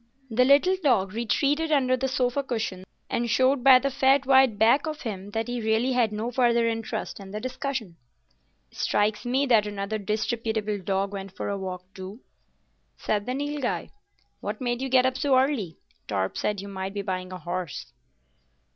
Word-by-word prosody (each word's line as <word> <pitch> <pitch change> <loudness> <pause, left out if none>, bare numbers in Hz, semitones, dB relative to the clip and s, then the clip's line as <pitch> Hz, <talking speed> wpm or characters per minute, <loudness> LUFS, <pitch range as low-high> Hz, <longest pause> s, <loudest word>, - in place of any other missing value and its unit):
The 250 +3 +4
little 290 +8 +5
dog 205 -9 +2
retreated 285 +7 0
under 260 -3 +3
the 265 +1 -1
sofa 255 +1 0
cushion, 220 -8 -4 0.2
and 235 0 -1
showed 260 +3 +3
by 265 -1 +9
the 275 +2 -1
fat 270 +1 +3
white 265 -5 +5
back 235 +8 +4
of 310 -1 -5
him 200 -4 -5
that 225 +2 -3
he 245 -1 -3
really 220 +4 +1
had 245 -4 +2
no 220 +3 -3
further 235 -1 +3
interest 225 -1 -3
in 195 -1 -10
the 210 +2 -5
discussion. 255 -6 -4 0.7
"Strikes 210 +1 0
me 260 +3 +1
that 225 -5 +4
another 205 +1 -3
disreputable 215 0 -2
dog 195 +1 -1
went 195 -1 -7
for - - -3
a 200 - -2
walk, 185 -1 -5
too," 190 +4 -9 0.8
said 205 0 -1
the 250 - -1
Nilghai. 290 -2 -2 0.5
"What - - -5
made 245 -1 -2
you 265 - -2
get 255 0 +4
up 260 0 +1
so 275 -3 +3
early? 255 - 0 0.3
Torp 95 -2 -1
said 205 -2 -1
you 200 - -8
might 190 0 -5
be 200 - -2
buying 185 -1 -4
a 185 - -5
horse." 175 -8 -5
230 Hz, 180 wpm, -26 LUFS, 200-260 Hz, 0.8 s, by